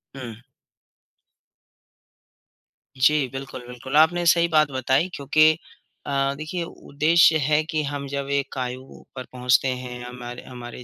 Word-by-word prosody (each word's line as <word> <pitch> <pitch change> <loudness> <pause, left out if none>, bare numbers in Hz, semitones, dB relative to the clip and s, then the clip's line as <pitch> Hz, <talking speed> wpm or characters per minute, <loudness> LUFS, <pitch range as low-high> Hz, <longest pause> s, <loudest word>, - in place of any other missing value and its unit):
हुँ। 120 -5 -8 2.6
जी, 145 +1 +3
बिल्कुल, 135 -2 -7
बिल्कुल, 125 +3 -7
आपने 175 +3 +4
सही 170 0 +4
बात 155 -3 +3
बताई 130 +6 +1
क्योंकि 155 +3 +3 0.5
अ, 140 0 0
देखिए 155 +4 -4
उद्देश्य 160 +1 +3
है 150 +2 +2
कि 155 -2 0
हम 140 -1 -4
जब 140 0 -4
एक 140 -1 -2
आयु 130 +1 -6
पर 130 - -5
पहुँचते 125 +1 +2
हैं, 125 -1 -5
हमारे 125 0 -8
हमारे 125 -1 -9
135 Hz, 125 wpm, -23 LUFS, 125-155 Hz, 2.6 s, आपने